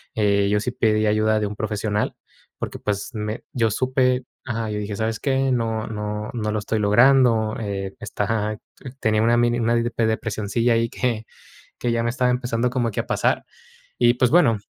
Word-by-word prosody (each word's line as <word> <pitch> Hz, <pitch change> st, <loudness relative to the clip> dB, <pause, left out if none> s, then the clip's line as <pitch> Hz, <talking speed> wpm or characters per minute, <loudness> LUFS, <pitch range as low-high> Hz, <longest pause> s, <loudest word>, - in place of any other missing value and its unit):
eh, 100 Hz, -2 st, +2 dB
yo 105 Hz, 0 st, +2 dB
sí 125 Hz, -, -2 dB
pedí 110 Hz, -3 st, +1 dB
ayuda 110 Hz, +1 st, +2 dB
de 105 Hz, -, 0 dB
un 105 Hz, -, -6 dB
profesional, 105 Hz, -1 st, -1 dB, 0.5 s
porque -, -, -4 dB
pues, 100 Hz, +3 st, -3 dB
me 105 Hz, +1 st, -4 dB
yo 115 Hz, -3 st, +1 dB
supe 130 Hz, +1 st, +1 dB, 0.2 s
Ajá, 115 Hz, -1 st, -2 dB
yo 105 Hz, -, -2 dB
dije: 105 Hz, 0 st, -4 dB
"¿Sabes 110 Hz, +1 st, -2 dB
qué?, 135 Hz, -1 st, +1 dB
no 115 Hz, -3 st, -1 dB
no 105 Hz, -1 st, -4 dB
no 110 Hz, -3 st, -2 dB
lo 110 Hz, -, 0 dB
estoy 110 Hz, +2 st, -2 dB
logrando, 115 Hz, 0 st, +4 dB
eh, 95 Hz, -2 st, -4 dB
esta" 105 Hz, -2 st, -3 dB
Ajá, 105 Hz, 0 st, -1 dB, 0.4 s
tenía 110 Hz, 0 st, +2 dB
una 115 Hz, +1 st, +4 dB
mini 120 Hz, 0 st, +2 dB
una 115 Hz, +1 st, +2 dB
depi 115 Hz, -1 st, 0 dB
depresioncilla 110 Hz, +1 st, 0 dB
ahí, 115 Hz, 0 st, +2 dB
que 115 Hz, -3 st, -2 dB, 0.5 s
que 120 Hz, -, 0 dB
ya 115 Hz, -, 0 dB
me 115 Hz, -, 0 dB
estaba 125 Hz, +1 st, +1 dB
empezando 125 Hz, -1 st, 0 dB
como 120 Hz, -2 st, -1 dB
que -, -, -4 dB
a -, -, -3 dB
pasar, -, -, +1 dB, 0.5 s
y, 120 Hz, 0 st, +4 dB
pues, 125 Hz, +1 st, +2 dB
bueno, 140 Hz, -10 st, +5 dB
110 Hz, 190 wpm, -23 LUFS, 105-120 Hz, 0.5 s, bueno